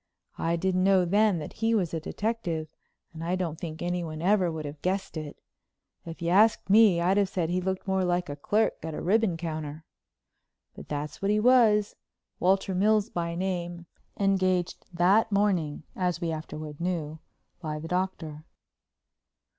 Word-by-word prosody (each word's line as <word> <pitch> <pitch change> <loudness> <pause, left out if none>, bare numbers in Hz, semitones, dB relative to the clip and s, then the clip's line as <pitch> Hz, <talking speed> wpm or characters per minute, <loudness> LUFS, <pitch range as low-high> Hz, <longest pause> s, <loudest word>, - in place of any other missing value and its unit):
I 165 +1 +1
didn't 185 +1 0
know 190 -1 +4
then 205 +1 +3
that 150 - -6
he 225 +1 +1
was 180 -6 0
a 165 - -1
detective, 175 -4 -3 0.4
and 160 0 -7
I 175 +2 0
don't 170 -4 -3
think 160 -1 -6
anyone 175 -3 -3
ever 185 0 +2
would 160 -1 -5
have 145 0 -8
guessed 190 +1 -2
it. 155 -2 -6 0.7
If 165 +1 -7
you'd 170 - 0
asked 210 +1 +4
me 210 -5 +6
I'd 180 +3 +2
have 200 -2 +2
said 175 -3 -1
he 180 +1 0
looked 190 +1 -3
more 190 -1 +1
like 180 0 0
a 145 - -5
clerk 210 +9 +1
at 160 0 -5
the - - -5
ribbon 200 -1 +2
counter. 155 -2 -5 0.9
But - - -11
that's 150 0 -5
what 195 - 0
he 210 +1 +3
was, 220 -3 +4 0.4
Walter 190 +1 +2
Mills 210 +3 +2
by 170 -1 -2
name, 175 -2 -3 0.3
engaged 185 -3 +1
that 190 +6 +3
morning, 185 -8 +1
as 180 -2 -1
we 170 -2 -2
afterward 155 -1 -7
knew, 160 -3 -3 0.4
by 155 -3 -4
the 155 +2 -7
Doctor. 165 -4 -3
180 Hz, 170 wpm, -27 LUFS, 160-195 Hz, 0.9 s, me